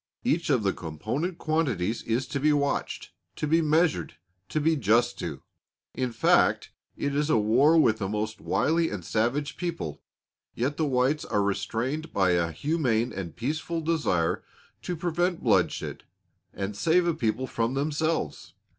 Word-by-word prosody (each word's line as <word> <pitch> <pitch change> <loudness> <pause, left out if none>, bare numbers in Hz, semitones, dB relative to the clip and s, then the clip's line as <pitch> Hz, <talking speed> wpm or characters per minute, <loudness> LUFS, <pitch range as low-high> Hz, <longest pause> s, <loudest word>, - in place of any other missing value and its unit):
Each 170 -10 0
of 125 -7 +3
the 95 - +1
component 115 - -4
quantities 125 - 0
is 120 +4 -1
to 140 - -2
be 150 +2 +3
watched, 140 -1 -1 0.2
to - - -2
be 165 +2 +3
measured, 160 +1 +1 0.3
to 155 - 0
be 160 +2 +3
just 120 -1 +2
to. 75 -5 -5 0.5
In 125 -1 -2
fact 115 - +3 0.3
it 140 0 -1
is 150 +1 +1
a 155 - +4
war 125 +10 +4
with 110 -9 +3
a 95 - -1
most 105 +1 -3
wily 165 +2 +1
and 90 -5 -6
savage 130 - -1
people, 170 - -4 0.5
yet 130 +5 -1
the 155 - +1
whites 130 +3 +1
are 105 - 0
restrained 130 +10 -2
by 95 -2 +2
a 85 -1 +1
humane 125 - 0
and 90 -5 -6
peaceful 155 +6 -2
desire 150 - 0 0.4
to 180 - -3
prevent 175 +1 -1
bloodshed - - +1 0.5
and 100 +1 -4
save 170 - +3
a 170 - +2
people 130 -3 -1
from 115 0 -1
themselves. 150 - -2
135 Hz, 155 wpm, -27 LUFS, 110-160 Hz, 0.5 s, a